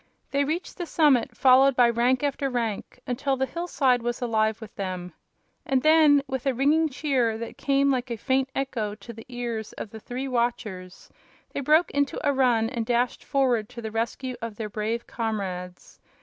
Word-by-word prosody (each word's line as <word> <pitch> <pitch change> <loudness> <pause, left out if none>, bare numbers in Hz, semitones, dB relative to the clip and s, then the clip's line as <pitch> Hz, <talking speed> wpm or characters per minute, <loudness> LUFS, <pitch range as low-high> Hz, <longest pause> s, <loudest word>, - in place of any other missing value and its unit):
They 280 0 +2
reached 315 +6 -3
the 350 -2 -4
summit, 295 -7 +3
followed 265 +1 +6
by 245 -1 +6
rank 245 +3 +2
after 280 -1 0
rank, 235 -2 -3
until 265 +2 -1
the 265 - +1
hillside 270 -6 0
was 240 0 -2
alive 220 -2 0
with 220 -2 -10
them. 185 -2 -5 0.5
And 265 -2 0
then, 310 -2 +6
with 265 -1 -4
a 265 - +1
ringing 305 +5 +3
cheer 255 -6 0
that 230 +1 -7
came 275 0 +2
like 255 -1 -1
a 235 - -3
faint 265 +4 0
echo 230 -6 -2
to 220 +3 -11
the 225 0 -12
ears 235 -3 -4
of 210 - -7
the 220 - -9
three 250 +5 -5
watchers, 225 -7 -3 0.4
they - - -2
broke 305 +5 +3
into 285 -1 0
a 285 - +3
run 245 -4 +3
and 235 -1 -3
dashed 240 +2 0
forward 250 -6 +1
to 245 -1 -9
the 220 - -4
rescue 235 +3 -3
of 230 -2 -5
their 215 0 -5
brave 220 +3 -3
comrades. 190 -6 -5
245 Hz, 185 wpm, -26 LUFS, 225-275 Hz, 0.5 s, followed